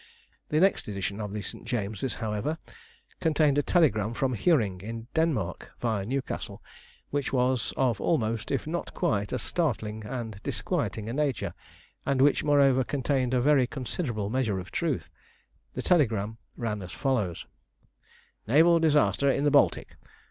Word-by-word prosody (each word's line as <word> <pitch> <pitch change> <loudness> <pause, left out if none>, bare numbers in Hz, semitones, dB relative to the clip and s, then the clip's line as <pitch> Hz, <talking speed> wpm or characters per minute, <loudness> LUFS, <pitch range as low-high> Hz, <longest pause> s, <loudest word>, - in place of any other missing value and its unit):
The 155 - +2
next 195 +3 +3
edition 100 +1 -3
of 105 -1 -4
the 105 0 -4
St. - - -6
James's, 110 0 -3
however, 110 +8 -2 0.6
contained 150 -3 +3
a - - +4
telegram 120 - +2
from 130 +1 0
Hiorring, 105 - +2
in 115 +2 -6
Denmark, 145 - -1
viâ 110 -5 -1
Newcastle, 135 +2 -3 0.5
which 145 -1 -1
was 125 -2 +1
of 125 -5 +1
almost, 115 -8 0
if 135 - -1
not 170 +3 -4
quite, 105 - 0
as - - -2
startling 110 -10 -1
and 110 -3 -5
disquieting 105 +2 -2
a 115 - -3
nature, 130 - -1 0.5
and 135 -1 0
which, 140 +2 +4
moreover, 140 -3 +4
contained 130 -2 0
a 125 - +3
very 135 -2 +4
considerable 120 - -3
measure 120 -6 0
of 95 0 -7
truth. - - -2 0.6
The - - -3
telegram 110 - +2 0.2
ran 105 -3 -2
as 90 -1 -8
follows: 110 - -1 1.0
NAVAL 165 +7 +5
DISASTER 150 -3 +3
IN 140 - +1
THE 145 - +3
BALTIC. 140 - +2
125 Hz, 150 wpm, -28 LUFS, 105-145 Hz, 1.0 s, NAVAL